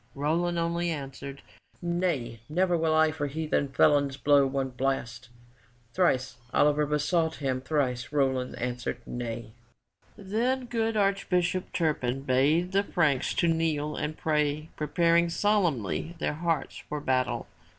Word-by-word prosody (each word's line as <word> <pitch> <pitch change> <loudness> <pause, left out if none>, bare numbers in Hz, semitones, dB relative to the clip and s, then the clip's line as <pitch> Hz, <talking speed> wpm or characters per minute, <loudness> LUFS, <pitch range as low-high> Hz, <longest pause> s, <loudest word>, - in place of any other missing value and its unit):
Roland 170 +5 0
only 170 +1 0
answered, 140 -2 -6 0.4
"Nay! 170 -10 -1
Never 180 +3 +2
will 160 -1 +1
I 160 0 +4
for 150 -2 -3
heathen 150 0 -1
felons 140 0 +3
blow 140 -1 +4
one 135 0 -1
blast!" 125 -2 -2 0.6
Thrice 135 -8 +1
Oliver 150 0 +3
besought 160 +2 +1
him; 130 -3 -2
thrice 130 -3 -1
Roland 130 -3 0
answered, 125 0 -3
"Nay!" 115 -2 -5 0.7
Then 235 +6 -1
good 225 -2 -1
Archbishop 185 -2 +1
Turpin 135 -6 -1
bade 145 +7 +2
the 195 +1 +3
Franks 155 -9 +1
to 170 - +2
kneel 160 -2 0
and 155 +1 -3
pray 150 0 0
preparing 170 +2 +2
solemnly 170 - 0
their 160 - -1
hearts 160 -2 -2
for 150 - -2
battle. 130 -3 0
150 Hz, 130 wpm, -28 LUFS, 135-170 Hz, 0.7 s, I